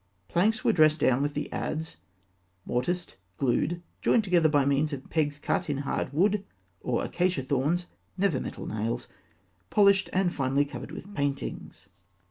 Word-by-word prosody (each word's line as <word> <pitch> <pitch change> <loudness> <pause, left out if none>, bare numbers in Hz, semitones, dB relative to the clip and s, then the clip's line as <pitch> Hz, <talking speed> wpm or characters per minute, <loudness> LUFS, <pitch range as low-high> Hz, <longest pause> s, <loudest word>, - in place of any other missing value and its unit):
Planks 210 - +2
were - - +3
dressed 155 -1 +4
down 130 +1 +3
with 145 0 -1
the 150 - -2
adze, 160 +1 -3 0.7
mortised, 175 +9 -2 0.2
glued, 165 +7 0 0.2
joined 230 - +3
together 175 -5 +3
by 145 -2 +3
means 140 +2 +2
of 135 -1 -6
pegs 150 -2 +1
cut 175 +3 -1
in 145 - 0
hard 140 -1 -2
wood, 195 +6 +2 0.4
or - - -1
acacia 180 -6 0
thorns 145 +7 0 0.3
(never 185 -8 +2
by - - -5
metal - - -6
nails), 110 +2 -3 0.6
polished, 200 -2 +4
and 185 -2 +1
finally 135 +1 +1
covered 135 -2 -8
with 200 +3 -9
paintings. 140 - -3
155 Hz, 155 wpm, -28 LUFS, 140-180 Hz, 0.7 s, dressed